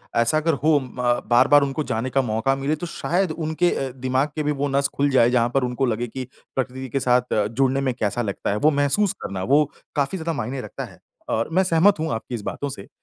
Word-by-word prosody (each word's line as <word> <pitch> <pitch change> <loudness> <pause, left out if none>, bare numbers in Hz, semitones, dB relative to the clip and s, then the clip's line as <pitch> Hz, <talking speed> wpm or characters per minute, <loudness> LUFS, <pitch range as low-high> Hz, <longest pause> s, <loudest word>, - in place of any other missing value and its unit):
ऐसा 115 +6 +3
अगर 160 +1 +1
हो 155 -1 +5
म 125 -2 -1
बार-बार 130 +4 +6
उनको 140 +2 -2
जाने 115 +4 -1
का 135 +1 +2
मौका 115 +3 0
मिले, 135 +3 -1
तो 155 - -6
शायद 175 +1 -1
उनके 160 +2 0
अ, 135 - -2 0.2
दिमाग 130 +3 +1
के 155 - -1
भी 150 - +1
वो 145 - +2
नस 140 0 +2
खुल 140 0 +2
जाए 125 -3 +4
जहाँ 120 -1 +2
पर 135 - +2
उनको 125 +2 0
लगे 120 0 -1
कि 130 +2 -6 0.3
प्रकृति 130 0 -3
के 135 - -1
साथ 125 -1 +1
अ, 105 - +2
जुड़ने 135 +4 +1
में 125 - 0
कैसा 110 +3 0
लगता 100 -4 -3
है। - - 0
वो 155 - +6
महसूस 175 +8 +2
करना, 95 -1 -4
वो 145 +6 +4 0.3
काफ़ी 145 +6 0
ज़्यादा 165 -1 -2
मायने 125 +4 -3
रखता - - -6
है, - - -15 0.3
और 115 +5 0
मैं 190 - +4
सहमत 180 +1 +4
हूँ 160 0 -1
आपकी 115 +2 -4
इस 115 - -5
बातों 145 - -4
से। 100 -7 -9
135 Hz, 240 wpm, -23 LUFS, 120-150 Hz, 0.3 s, बार-बार